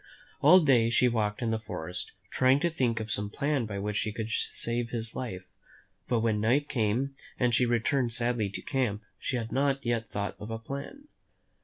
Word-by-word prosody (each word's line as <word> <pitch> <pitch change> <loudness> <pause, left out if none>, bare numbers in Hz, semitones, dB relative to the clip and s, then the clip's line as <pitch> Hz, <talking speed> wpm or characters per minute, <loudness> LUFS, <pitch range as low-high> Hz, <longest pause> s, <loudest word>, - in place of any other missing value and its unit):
All 180 +6 +8
day 125 -7 +4
she 125 +2 +4
walked 110 -1 0
in 115 - +1
the 110 - 0
forest, 90 -4 -5 0.2
trying 130 +2 +4
to 170 0 +2
think 120 -7 0
of 110 -1 -4
some 105 0 0
plan 140 0 0
by 100 -2 -4
which 105 +1 -2
she 110 - 0
could 110 +1 -4
save 115 0 -1
his 115 -1 -4
life; 95 -8 -4 0.6
but 120 -2 +1
when 110 -2 +1
night 130 +7 +2
came 120 +3 0 0.3
and 125 -2 +2
she 125 +2 +3
returned 120 +1 +1
sadly 120 -3 0
to 100 - -7
camp, 120 -6 -1 0.2
she 130 - -1
had 115 -1 -4
not 135 0 +1
yet 115 -2 0
thought 100 0 -3
of 105 - -7
a 115 - -3
plan. 140 - -7
115 Hz, 195 wpm, -29 LUFS, 110-130 Hz, 0.6 s, All